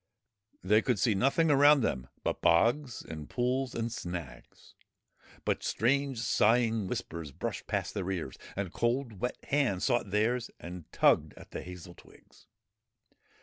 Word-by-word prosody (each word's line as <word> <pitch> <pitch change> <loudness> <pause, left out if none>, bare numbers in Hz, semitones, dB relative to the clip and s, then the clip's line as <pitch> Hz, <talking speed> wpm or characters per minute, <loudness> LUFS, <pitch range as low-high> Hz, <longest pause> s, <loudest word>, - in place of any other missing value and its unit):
They 105 +4 +4
could 125 0 +1
see 105 +4 +2
nothing 140 +9 +3
around 145 0 +6
them 65 - -1 0.2
but - - -2
bogs 120 - +2
and 75 -2 -8
pools 125 +1 -1
and 115 0 -2
snags; 85 - -8 0.7
but - - 0
strange 135 +2 +1
sighing 115 -2 +2
whispers 80 -4 -5
brushed - - -5
past - - -2
their 95 -3 -3
ears, 90 -4 -3 0.2
and 95 -3 -3
cold 120 -3 -1
wet 125 +1 -2
hands 130 -10 +1
sought 120 -4 +1
theirs 115 +4 +1
and 85 -2 -9
tugged - - +3
at - - -13
the - - -5
hazel 90 0 -9
twigs. - - -20
115 Hz, 145 wpm, -30 LUFS, 90-125 Hz, 0.7 s, around